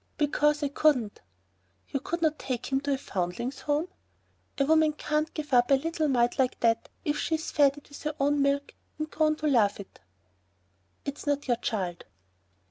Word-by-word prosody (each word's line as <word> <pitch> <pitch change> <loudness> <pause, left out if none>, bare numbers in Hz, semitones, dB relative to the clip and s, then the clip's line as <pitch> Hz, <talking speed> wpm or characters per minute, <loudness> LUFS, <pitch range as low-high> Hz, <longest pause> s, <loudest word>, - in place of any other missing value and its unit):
"Because 295 0 +2
I 285 - +1
couldn't." 275 -7 +1 0.7
"You 275 - -1
could 335 +5 -3
not 310 -1 +1
take 255 0 -4
him 270 0 +2
to 285 0 0
a - - 0
Foundlings' 200 +3 -3
Home?" 295 +3 0 0.7
"A 275 - +2
woman 315 0 +4
can't 300 +1 -1
give 300 -3 -5
up 245 0 +5
a 275 - +7
little 315 +2 -1
mite 245 -1 +2
like 260 -1 +1
that 230 -1 +2 0.2
if 295 0 0
she's 320 -1 -1
fed 285 -1 +4
it 290 - -13
with 285 - -11
her 305 0 -3
own 285 +1 +2
milk 280 0 0 0.2
and 310 0 -4
grown 310 -1 +2
to 305 0 -2
love 225 -9 +3
it." 200 - -11 1.1
"It's 280 +1 -6
not 285 0 0
your 240 -2 +2
child." 190 -7 -3
285 Hz, 185 wpm, -28 LUFS, 250-300 Hz, 1.1 s, a